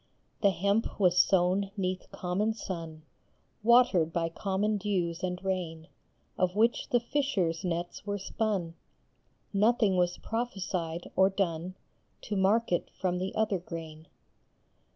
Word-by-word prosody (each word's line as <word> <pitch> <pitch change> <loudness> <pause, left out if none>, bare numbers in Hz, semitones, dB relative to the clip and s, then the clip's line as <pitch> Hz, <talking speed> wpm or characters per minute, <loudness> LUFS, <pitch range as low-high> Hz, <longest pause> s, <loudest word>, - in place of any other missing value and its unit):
The 200 - +6
hemp 200 +5 0
was 180 -3 +4
sown 190 +1 +3
neath 185 -1 -3
common 195 +5 -1
sun, 165 -6 -6 0.6
Watered 220 -8 +5
by 165 0 0
common 200 +4 -1
dews 180 -4 -1
and 180 -1 -2
rain, 170 -4 -3 0.5
Of 185 0 +1
which 230 +3 +2
the 245 - +4
fishers 230 - 0
nets 175 -1 -3
were 205 0 -2
spun; 195 -4 -2 0.8
Nothing 210 -1 +3
was 180 0 +1
prophesied 185 -7 -3
or 190 +1 +5
done 185 -2 -2 0.5
To 210 - -4
mark 200 +4 +2
it 175 - 0
from 180 -1 0
the 190 +1 -3
other 210 -4 +1
grain. 165 -2 -8
185 Hz, 130 wpm, -30 LUFS, 175-205 Hz, 0.8 s, The